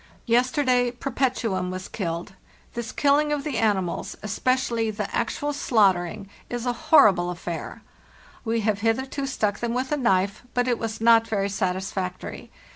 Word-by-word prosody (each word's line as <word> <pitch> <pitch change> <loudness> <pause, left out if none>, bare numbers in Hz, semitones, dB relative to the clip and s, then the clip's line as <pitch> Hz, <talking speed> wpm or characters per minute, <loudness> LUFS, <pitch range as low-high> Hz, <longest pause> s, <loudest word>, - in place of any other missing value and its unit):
Yesterday 250 +1 +2
' 245 - -25
Perpetuum' 235 -8 0
was 185 +1 -5
killed. 170 -3 -4 0.4
This 235 -1 -4
killing 295 +1 +2
of 290 -2 -1
the 280 -6 -2
animals, 195 -6 0
especially 235 +1 0
the 210 - -4
actual 290 0 -1
slaughtering, 200 -6 +1 0.2
is 240 0 -4
a 245 - +1 0.2
horri 215 -10 +8
ble 175 0 -2
affair. 170 -1 -6 0.6
We 230 0 0
have 210 -1 0
hitherto 265 +5 -1
stuck 215 -6 -1
them 235 0 -2
with 255 +2 -2
a 295 - +2
knife, 200 -5 +1
but 245 0 +2
it 240 -2 +1
was 225 -1 -4
not 225 0 +5
very 200 -2 0
satisfactory. 185 -1 -3
225 Hz, 155 wpm, -25 LUFS, 195-255 Hz, 0.6 s, horri